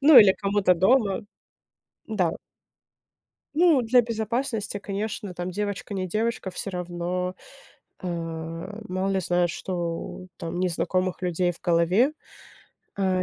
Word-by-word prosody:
Ну, 285 Hz, -1 st, +9 dB
или 205 Hz, -4 st, +9 dB
кому-то 195 Hz, -2 st, +3 dB
дома. 195 Hz, +2 st, +3 dB, 0.9 s
Да. 185 Hz, -7 st, +1 dB, 1.2 s
Ну, 325 Hz, -5 st, +5 dB
для 240 Hz, +2 st, +5 dB
безопасности, 225 Hz, -1 st, -2 dB
конечно, 205 Hz, -1 st, -4 dB
там 175 Hz, +1 st, -4 dB
девочка 205 Hz, +1 st, -3 dB
не 185 Hz, -1 st, -2 dB
девочка, 215 Hz, 0 st, -1 dB
всё 195 Hz, -, -4 dB
равно, 180 Hz, 0 st, -3 dB, 0.7 s
а, 185 Hz, -, -6 dB, 0.8 s
мало 185 Hz, +1 st, -1 dB
ли 190 Hz, -, +1 dB
знают, 175 Hz, 0 st, +2 dB
что 175 Hz, +1 st, -4 dB
там 165 Hz, +1 st, -4 dB
незнакомых 185 Hz, +1 st, 0 dB
людей 180 Hz, 0 st, +1 dB
в 175 Hz, -, -15 dB
голове. 180 Hz, -, +3 dB, 0.8 s
А, 190 Hz, -2 st, +1 dB
190 Hz, 120 wpm, -26 LUFS, 180-215 Hz, 1.2 s, Ну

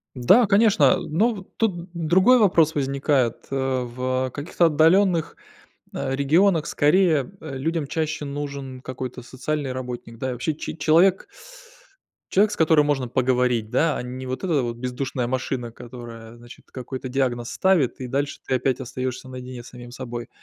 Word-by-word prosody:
Да, 195 Hz, -, +5 dB
конечно. 200 Hz, -5 st, +4 dB
Э, 130 Hz, -, +5 dB
ну 200 Hz, +6 st, 0 dB
тут 180 Hz, -5 st, -1 dB
другой 185 Hz, +9 st, +4 dB
вопрос 170 Hz, -7 st, +4 dB
возникает, 135 Hz, -3 st, 0 dB
э, -, -, -1 dB, 0.3 s
в, 130 Hz, +2 st, -2 dB
э, -, -, -9 dB
каких-то 160 Hz, +6 st, 0 dB
отдалённых, 165 Hz, +2 st, +3 dB, 0.6 s
э, 135 Hz, -, -2 dB
регионах, 160 Hz, +4 st, +3 dB
скорее, 155 Hz, 0 st, +2 dB
э, 135 Hz, -4 st, -6 dB
людям 160 Hz, +1 st, -2 dB
чаще 155 Hz, 0 st, -2 dB
нужен 140 Hz, -2 st, -6 dB
какой-то 130 Hz, -1 st, -6 dB
социальный 135 Hz, +2 st, -3 dB
работник, 125 Hz, -2 st, -7 dB
да? 130 Hz, -, -3 dB
И -, -, -2 dB
вообще 125 Hz, +6 st, -2 dB
че 150 Hz, -, -6 dB
человек 175 Hz, +4 st, +3 dB, 1.0 s
человек, 205 Hz, +2 st, +4 dB
с -, -, -3 dB
которым 160 Hz, -2 st, +4 dB
можно 135 Hz, -4 st, 0 dB
поговорить, 125 Hz, -3 st, +1 dB
да, 150 Hz, +3 st, +2 dB
а -, -, -4 dB
не 130 Hz, +1 st, -7 dB
вот 130 Hz, +6 st, -4 dB
эта 160 Hz, -7 st, +1 dB
вот, 120 Hz, -1 st, -4 dB
бездушная 125 Hz, +1 st, -3 dB
машина, 125 Hz, -1 st, -3 dB
которая, 115 Hz, -1 st, -10 dB
значит, 120 Hz, 0 st, -15 dB
какой-то 130 Hz, 0 st, -6 dB
диагноз 125 Hz, -3 st, -1 dB
ставит, 175 Hz, -9 st, +2 dB
и 125 Hz, -, -4 dB
дальше, 140 Hz, +3 st, -2 dB
ты -, -, -2 dB
опять, 130 Hz, 0 st, 0 dB
остаёшься 130 Hz, 0 st, -5 dB
наедине 125 Hz, -1 st, -8 dB
с -, -, -12 dB
самим 125 Hz, -1 st, -11 dB
собой. 120 Hz, -1 st, -7 dB
135 Hz, 160 wpm, -23 LUFS, 125-160 Hz, 1.0 s, Да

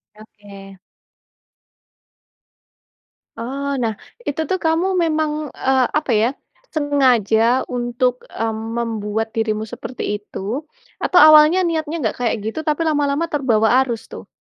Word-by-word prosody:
Oke. 200 Hz, -3 st, -14 dB, 2.6 s
Oh 270 Hz, +5 st, -4 dB
nah 220 Hz, -1 st, 0 dB, 0.3 s
itu 290 Hz, +2 st, -1 dB
tuh 375 Hz, -, +1 dB
kamu 325 Hz, +3 st, +2 dB, 0.2 s
memang, 310 Hz, -1 st, 0 dB, 0.2 s
eee, 265 Hz, -1 st, +1 dB, 0.2 s
apa 285 Hz, -, -4 dB
ya, 230 Hz, -, +3 dB, 0.5 s
sengaja 255 Hz, -5 st, +2 dB
untuk, 245 Hz, +1 st, 0 dB, 0.2 s
mmm, 225 Hz, -1 st, -2 dB, 0.2 s
membuat 220 Hz, -1 st, -2 dB
dirimu 220 Hz, -1 st, -1 dB
seperti 250 Hz, -, -7 dB, 0.2 s
itu, -, -, -9 dB, 0.6 s
atau 355 Hz, -, +4 dB
awalnya 310 Hz, +4 st, +7 dB
niatnya 320 Hz, -1 st, -2 dB
enggak 220 Hz, -6 st, -1 dB
kayak 235 Hz, -, +1 dB
gitu 225 Hz, +8 st, -3 dB
tapi 305 Hz, +2 st, +1 dB
lama-lama 290 Hz, +1 st, +1 dB
terbawa 230 Hz, -6 st, +2 dB
arus 235 Hz, -4 st, -2 dB
tuh? -, -, -9 dB
255 Hz, 115 wpm, -20 LUFS, 225-300 Hz, 2.6 s, awalnya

